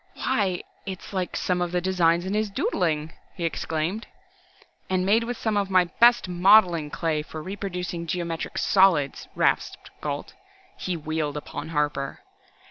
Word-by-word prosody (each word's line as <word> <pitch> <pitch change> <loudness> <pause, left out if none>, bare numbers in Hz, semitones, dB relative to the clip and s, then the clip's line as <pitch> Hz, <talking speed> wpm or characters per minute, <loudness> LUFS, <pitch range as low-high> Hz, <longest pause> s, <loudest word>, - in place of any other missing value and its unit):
"Why 190 -4 0 0.2
its 190 0 -7
like 185 -2 -2
some 180 -1 0
of 175 -1 -1
the 180 - +1
designs 175 -1 +2
in 190 - -2
his 215 0 0
doodling," 160 -5 -1 0.2
he 170 - -3
exclaimed. 165 +5 -2 0.8
"And 185 -1 +1
made 220 +4 +4
with 245 0 -4
some 220 -2 -1
of 200 -1 0
my 185 -1 +5 0.2
best 240 -3 +6
modeling 180 -3 +5
clay 155 -1 -1
for 155 +1 -8
reproducing 180 -3 -4
geometric 170 -2 -3
solids!" 175 -8 +3
rasped - - 0
Gault. 145 -1 -4 0.4
He 180 -2 -3
wheeled 155 -2 -2
upon 150 +1 -6
Harper. 150 -3 -1
180 Hz, 145 wpm, -25 LUFS, 160-195 Hz, 0.8 s, best